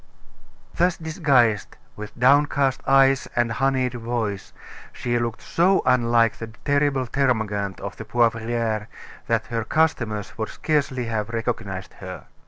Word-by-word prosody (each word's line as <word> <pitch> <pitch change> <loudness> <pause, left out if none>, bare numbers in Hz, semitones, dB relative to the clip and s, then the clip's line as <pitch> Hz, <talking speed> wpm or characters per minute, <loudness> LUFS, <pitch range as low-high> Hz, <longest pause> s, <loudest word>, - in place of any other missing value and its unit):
Thus 180 +1 +1
disguised, 140 - +1 0.2
with 105 0 -9
downcast 140 0 +3
eyes 135 0 +4
and 120 -1 +1
honeyed 130 0 0
voice, 115 -4 -3 0.4
she 120 -1 -1
looked 115 -1 -3
so 185 +3 +2
unlike 115 -2 +3
the 115 - -6 0.2
terrible 140 -2 +2
termagant 110 -7 -1
of 100 - -6
the - - -6
Poivriere, 115 -1 0 0.4
that - - +1
her 115 -1 0
customers 115 -8 0
would 110 - -2
scarcely 140 -5 -1
have 110 -2 -2
recognized 115 -5 -4
her. 95 -1 -8
120 Hz, 125 wpm, -23 LUFS, 110-135 Hz, 0.4 s, eyes